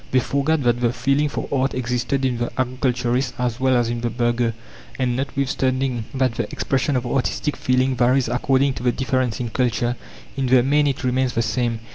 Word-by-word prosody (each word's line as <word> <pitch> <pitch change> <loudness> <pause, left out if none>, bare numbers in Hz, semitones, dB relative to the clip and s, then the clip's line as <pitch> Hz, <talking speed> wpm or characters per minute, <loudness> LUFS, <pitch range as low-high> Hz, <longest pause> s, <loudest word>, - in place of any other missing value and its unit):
They 130 - +3
forgot 140 +4 0
that 120 -1 +2
the 120 -1 +2
feeling 135 +5 +1
for - - -4
art 135 -1 0
existed 125 +2 -1
in 125 -2 0
the 120 - -2
agriculturist 125 0 0
as 125 -1 -2
well 130 0 +3
as 120 -1 +1
in 120 0 -3
the 120 - 0
burgher, 120 -1 0 0.4
and, 125 -2 0
notwithstanding 135 -2 -1
that 130 -2 +1
the - - -3
expression 135 +1 0
of 125 - -1
artistic 135 +4 -1
feeling 130 +1 +1
varies 125 +2 +3
according 130 +3 +2
to - - -7
the 125 - +3
difference 130 -2 -1
in 120 -2 -3
culture, 120 0 0 0.4
in 135 -1 -1
the 125 -1 +5
main 145 +2 +3
it 135 -2 -2
remains 130 0 +1
the 115 - +1
same. 120 -2 -1
125 Hz, 195 wpm, -22 LUFS, 120-135 Hz, 0.4 s, the